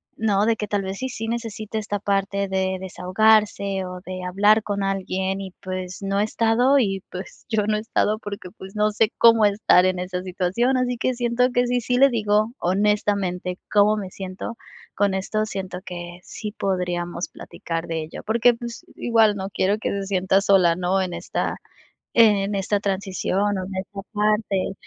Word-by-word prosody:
¿no?, 210 -2 +2
de 230 0 +3
que 210 -1 -4
tal 205 -1 -1
vez 190 +1 -4
si 260 - -3
sí 225 -3 -5
necesita 225 -2 -4
esta 205 -1 -3
parte 200 0 0
de 190 0 -1
desahogarse, 195 +1 +2
o 180 0 -7
de 185 0 -6
hablar 205 +4 +4
con 200 -1 -2
alguien, 190 0 -1
y 190 -1 -7
pues 185 -1 -5
no 195 0 -1
he - - +3
estado, 230 +5 +3
y 195 -5 0
pues 185 0 -9
yo 215 -2 +1
no 215 0 +2
he - - -1
estado 215 -1 0
porque 200 -4 -7
pues 190 0 -12
no 210 0 +2
sé 220 +1 +2
cómo 230 -2 +6
estar 200 -3 +4
en 185 -1 +1
esa 180 0 -3
situación, 190 +8 0
así 250 -1 0
que 255 +2 0
siento 240 +1 +1
que 245 0 +2
si 245 0 +1
sí 245 +2 0
le 275 +2 +7
digo, 215 -2 +1
honestamente 190 -2 0
cómo 210 +1 +5
me 195 -3 -5
siento 190 +5 -6 0.4
con 200 -1 +2
esto, 215 +3 -1
siento 190 -3 -5
que 175 -1 -7
sí 210 -1 -6
podríamos 175 -3 -2
platicar 165 0 -6
de 165 -1 -2
ello, 160 - -9
porque 235 +2 +4
pues 235 0 -8
igual 225 -3 +3
no 195 0 -5
quiero 195 +2 +1
que 215 - -2
se 200 -1 -3
sienta 190 0 +2
sola, 185 -4 +4
¿no? 180 +2 0
En 185 -2 -3
esta - - -3 0.6
en 210 -3 +4
esta 200 +1 0
transición, 195 -1 -2 0.2
o 185 - -3
en 190 +1 -7
esta 195 +1 -5
parte. 210 -2 +1
200 Hz, 185 wpm, -23 LUFS, 185-215 Hz, 0.6 s, le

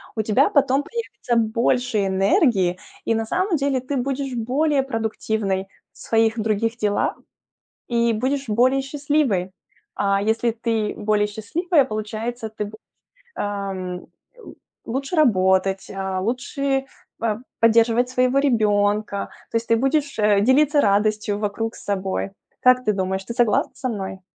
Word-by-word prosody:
У 220 - 0
тебя 220 +7 +3
потом 275 -1 +2
появится 255 - -4
больше 230 -1 +1
энергии, 195 - +2 0.3
и - - +2
на 225 0 -1
самом 365 - 0
деле 275 -2 0
ты 270 +2 -3
будешь 270 +1 -2
более 270 +5 +1
продуктивной 220 -5 -2 0.3
в - - -23
своих 225 0 +1
других 220 +2 0
делах 205 -2 0 0.7
и 235 -1 +2
будешь 265 +3 -1
более 255 +5 +3
счастливой. 270 -9 0 0.4
А 200 0 +1
если 225 +2 +1
ты 225 -2 -1
более 210 0 +1
счастливая, 280 - +1
получается 220 +2 -4
ты 210 -1 -4
б 205 - -10 0.6
ам 195 -3 -4 0.3
л 475 - -13 0.3
лучше 275 +7 -3
работать, 190 - +2
а, 190 -1 -2
лучше 270 +4 -1 0.3
п 220 -2 -1 0.2
поддерживать 230 +1 +4
своего 255 +1 +2
ребёнка, 210 -5 +1 0.2
то - - -7
есть 230 - -4
ты 230 - +5
будешь, 275 0 0
э, 210 -1 +4
делиться 290 +6 +4
радостью 210 0 +1
вокруг 220 +2 -3
с - - -12
собой. 195 -1 -2 0.3
Как 255 0 +5
ты 215 - +3
думаешь, 190 0 -2
ты 235 - -5
согласна 235 -4 +2
со 255 - -3
мной? 190 -4 -5
225 Hz, 140 wpm, -22 LUFS, 205-260 Hz, 0.7 s, ты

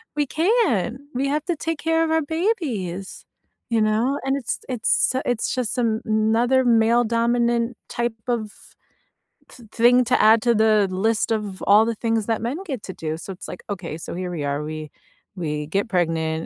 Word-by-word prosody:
We 295 -1 +1
can't! 310 - +1 0.2
We 275 +2 0
have 300 +1 -1
to 350 - -1
take 325 0 -3
care 325 0 +1
of 320 - -1
our 320 0 +3
babies, 285 - -3 0.4
you 230 -2 +2
know? 225 +6 +1
And 270 0 +1
it's 255 -5 -3
it's 245 0 +1
it's 245 -2 -1
just 255 -1 -2
a 225 -2 +1
another 225 +4 +2
male 235 0 +4
dominant 235 0 +1
type 235 -1 -1
of 225 -4 -1 1.0
th 235 -3 -15
thing 245 +2 +5
to 245 +1 +2
add 220 +1 +6
to 235 -1 +3
the 215 -2 +4
list 215 +5 0
of 210 -3 -3
all 210 +2 +6
the 230 - -1
things 225 -1 -1
that 225 -1 -1
men 245 +7 -2
get 265 - -4
to 190 - -6
do, 155 -1 -4
so 195 - -7
it's 185 - -10
like, 180 - -8
"Okay, 175 -6 -5
so - - -7
here 180 0 -4
we 165 -5 -4
are, 140 +1 -1
we 155 0 -6 0.5
we 150 -4 -3
get 195 +8 -1
pregnant, 160 -4 0
230 Hz, 185 wpm, -22 LUFS, 195-250 Hz, 1.0 s, add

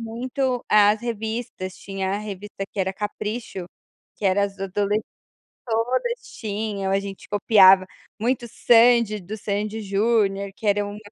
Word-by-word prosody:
muito 245 +2 -2
as 210 0 +5
revistas, 220 -4 -4
tinha 195 -1 -4
a 200 - -1
revista 205 -1 -6
que - - -9
era 190 0 +1
a - - -8
Capricho, 210 -2 -5 0.5
que 210 - -9
era 195 +1 +3
as 200 0 -6
adoles 200 +2 0 0.7
todas 255 - -1 0.2
tinham, 205 -2 -3
a 195 - +3
gente 200 -1 -8
copiava 195 -2 +6 0.3
muito 240 +2 0
Sandy, 235 -2 +4
do 200 +3 -7
Sandy& 210 +1 -3
Júnior, 200 -1 +1
que 215 - -5
era 205 0 +2
um 205 0 -7
210 Hz, 145 wpm, -23 LUFS, 195-225 Hz, 0.7 s, copiava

